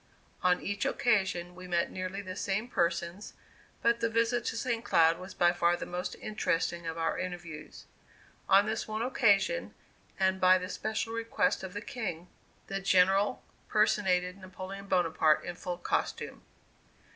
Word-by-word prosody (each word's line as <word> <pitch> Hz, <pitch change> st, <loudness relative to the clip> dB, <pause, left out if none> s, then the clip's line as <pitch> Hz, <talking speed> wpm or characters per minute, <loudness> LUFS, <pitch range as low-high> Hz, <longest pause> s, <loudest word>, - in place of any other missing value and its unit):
On 180 Hz, 0 st, +3 dB
each 200 Hz, 0 st, -2 dB
occasion 190 Hz, -6 st, +1 dB
we 185 Hz, 0 st, -10 dB
met 170 Hz, -1 st, 0 dB
nearly 185 Hz, +2 st, -4 dB
the 185 Hz, -1 st, -6 dB
same 200 Hz, +4 st, -1 dB
persons, 170 Hz, -1 st, -1 dB, 0.5 s
but 235 Hz, 0 st, +3 dB
the 230 Hz, 0 st, +1 dB
visit 230 Hz, +1 st, +1 dB
to -, -, -2 dB
St. 235 Hz, -2 st, -1 dB
Cloud 165 Hz, -4 st, +4 dB
was 185 Hz, +1 st, -9 dB
by 175 Hz, 0 st, +4 dB
far 175 Hz, 0 st, +2 dB
the -, -, -5 dB
most 180 Hz, +1 st, -4 dB
interesting 170 Hz, -4 st, -1 dB
of 165 Hz, 0 st, -4 dB
our 165 Hz, 0 st, -1 dB
interviews. 175 Hz, -4 st, -7 dB, 0.6 s
On 195 Hz, +1 st, +6 dB
this 220 Hz, +1 st, -2 dB
one 215 Hz, +1 st, -2 dB
occasion, 250 Hz, -, +2 dB, 0.4 s
and 190 Hz, 0 st, +2 dB
by 185 Hz, 0 st, +7 dB
the 185 Hz, 0 st, -5 dB
special 220 Hz, +2 st, -3 dB
request 230 Hz, +4 st, 0 dB
of 190 Hz, 0 st, -7 dB
the 205 Hz, -, -3 dB
King, 180 Hz, -8 st, -5 dB, 0.4 s
the 195 Hz, 0 st, -4 dB
General 195 Hz, +4 st, +3 dB, 0.3 s
personated 190 Hz, -4 st, +2 dB
Napoleon 190 Hz, +1 st, -8 dB
Bonaparte 165 Hz, -4 st, +3 dB
in 175 Hz, -, -4 dB
full 175 Hz, 0 st, -5 dB
costume. 175 Hz, -, -2 dB
185 Hz, 155 wpm, -30 LUFS, 175-215 Hz, 0.6 s, by